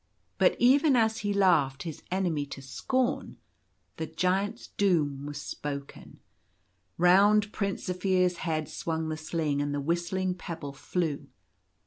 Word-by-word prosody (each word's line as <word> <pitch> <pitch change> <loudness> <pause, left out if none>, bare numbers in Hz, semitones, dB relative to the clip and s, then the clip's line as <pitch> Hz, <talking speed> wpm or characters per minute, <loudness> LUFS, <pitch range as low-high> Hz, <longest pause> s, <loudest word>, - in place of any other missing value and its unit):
But - - +4
even 275 +3 +5
as 220 -2 +2
he 205 0 -1
laughed 165 -9 +3
his 160 -2 -6
enemy 175 -6 -1
to 140 - -8
scorn, 255 - -1 0.6
the 160 - -3
Giant's 185 +5 -1
doom 150 -8 +1
was 145 0 -5
spoken. 140 -1 -7 0.8
Round 200 +4 +5
Prince 200 -2 -2
Zaphir's 180 -1 +1
head 155 -3 -2
swung 160 -1 -3
the 155 - -2
sling, 155 -2 -1
and 145 0 -1
the - - -1
whistling 175 +5 -1
pebble 165 -6 -7
flew. 155 +1 -3
175 Hz, 130 wpm, -28 LUFS, 150-195 Hz, 0.8 s, even